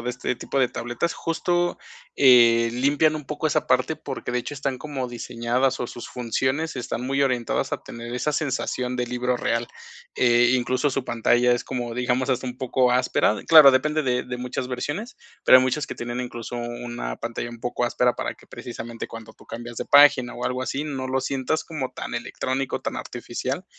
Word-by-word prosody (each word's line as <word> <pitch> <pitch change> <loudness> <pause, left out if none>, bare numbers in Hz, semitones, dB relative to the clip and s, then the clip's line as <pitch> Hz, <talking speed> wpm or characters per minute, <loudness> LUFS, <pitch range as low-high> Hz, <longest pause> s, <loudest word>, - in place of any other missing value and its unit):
de 125 - -4
este 125 0 -3
tipo 135 - -3
de 125 -2 +3
tabletas, 120 +8 -3
justo, 175 +1 -1 0.4
eh, 115 -3 +6
limpian 145 +5 +2
un 150 -2 -6
poco 150 +2 -2
esa 150 - 0
parte, 130 +5 +2
porque 130 -4 -6
de 125 - +1
hecho 125 - -5
están 140 -2 -3
como 135 -2 -4
diseñadas, 120 +2 -1
o 120 - -1
sus 120 - -8
funciones 130 +6 -1
están 125 0 -4
muy 135 +1 0
orientadas 125 -3 0
a - - -3
tener 120 +1 -8
esa 150 +5 -1
sensación 130 -3 -2
de 125 0 -1
libro 125 +1 -1
real. 115 0 -1 0.5
Eh, 120 0 +4
incluso, 130 +3 0
su 135 -1 -2
pantalla 120 +1 +2
es 120 - 0
como, 120 -3 -4
digamos, 125 +1 0
hasta 130 0 -1
un 125 0 -5
poco 130 -1 +1
áspera. 125 -3 +2
Claro, 155 -4 +10
depende 150 +4 +1
de 125 -2 0
de 125 0 -5
muchas 125 0 -4
versiones, 145 - -4 0.3
pero 130 - +9
hay - - +3
muchas 145 +4 0
que - - -6
tienen, 120 +1 -4
incluso, 120 -1 -6
una 120 - -5
pantalla 120 0 -5
un 120 -1 -11
poco 120 0 -1
áspera 125 0 +1
para - - -3
que - - -21
precisamente 120 -1 -7
cuando 115 -1 -10
tú - - -19
cambias 120 0 -8
de - - -3
página 145 -4 +6
o 125 - -5
algo 125 0 -2
así, 140 +3 -3
no 135 -3 -4
lo 130 +1 0
sientas 135 +4 -1
como 150 -6 -5
tan - - -6
electrónico, 130 +1 -3
tan - - -4
artificial, - - -4
125 Hz, 195 wpm, -24 LUFS, 120-135 Hz, 0.5 s, Claro